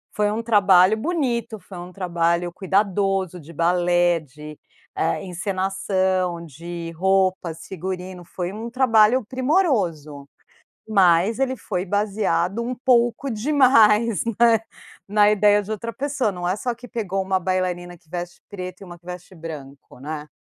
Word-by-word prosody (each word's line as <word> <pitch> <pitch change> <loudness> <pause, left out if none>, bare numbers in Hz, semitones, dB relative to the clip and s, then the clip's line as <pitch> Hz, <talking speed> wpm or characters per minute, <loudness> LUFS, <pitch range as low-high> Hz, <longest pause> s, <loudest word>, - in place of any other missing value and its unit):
foi 210 0 +1
um 220 +2 -2
trabalho 200 -2 +5
bonito, 235 - -2
foi 190 - -12
um 175 +1 -9
trabalho 170 -1 0
cuidadoso 195 -1 0
de 165 +1 -13
balé, 175 +1 +2
de, 150 +1 -12 0.4
eh, 85 - 0
encenação, 185 -1 -1
de 170 +2 -7
roupas, 185 -2 0
figurino, 185 0 -6
foi 175 +1 -5
um 225 +3 -6
trabalho 235 -1 +4
primoroso, 210 - 0 0.6
mas 195 +1 +3
ele 260 -1 0
foi 180 -5 -3
baseado 205 0 0
um 250 +2 -3
pouco 240 0 +2
demais, 230 -4 +4 0.2
né, 230 -2 +5 0.5
na 210 0 +4
ideia 205 0 +4
de 205 - -10
outra 230 +2 -5
pessoa, 275 -4 -1
não 175 -1 -4
é 185 - +1
só 240 +3 -2
que 245 +1 -13
pegou 200 -6 -3
uma 190 0 0
bailarina 180 -1 -2
que 160 - -33
veste 175 0 -6
preto 185 -2 -7
e - - -8
uma 175 -1 -11
que 170 - -37
veste 180 +1 -9
branco, 145 -6 -10
né. 150 +2 -6
190 Hz, 145 wpm, -22 LUFS, 175-220 Hz, 0.6 s, trabalho